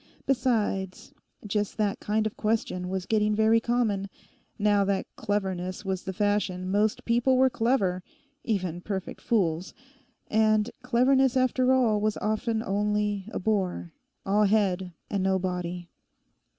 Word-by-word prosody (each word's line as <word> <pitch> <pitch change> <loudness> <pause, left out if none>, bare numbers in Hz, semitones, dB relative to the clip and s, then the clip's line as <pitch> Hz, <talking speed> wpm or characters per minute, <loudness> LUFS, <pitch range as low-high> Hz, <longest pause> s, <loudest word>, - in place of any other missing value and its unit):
Besides, 215 -8 -1 0.3
just 205 0 -2
that 210 -2 0
kind 215 +1 0
of 215 - -3
question 210 -4 -1
was 190 -1 -3
getting 210 0 +1
very 220 +1 +4
common. 220 -4 0 0.5
Now 205 -1 +3
that 195 -1 0
cleverness 190 -2 -3
was 190 -1 -2
the 190 - -5
fashion 190 -2 -1
most 210 +2 +1
people 240 +3 +3
were 260 0 +4
clever—even 205 - -2
perfect 190 -1 -5
fools; 180 -6 0 0.5
and 215 0 +2
cleverness 260 +1 +3
after 255 0 +2
all 235 -5 +3
was 215 0 0
often 220 +1 -1
only 210 -1 -1
a - - -3
bore: 185 -4 -1 0.3
all 205 +2 +3
head 195 -3 +1 0.2
and 200 - -2
no 190 0 +2
body. 180 -1 -4
210 Hz, 130 wpm, -27 LUFS, 190-225 Hz, 0.5 s, very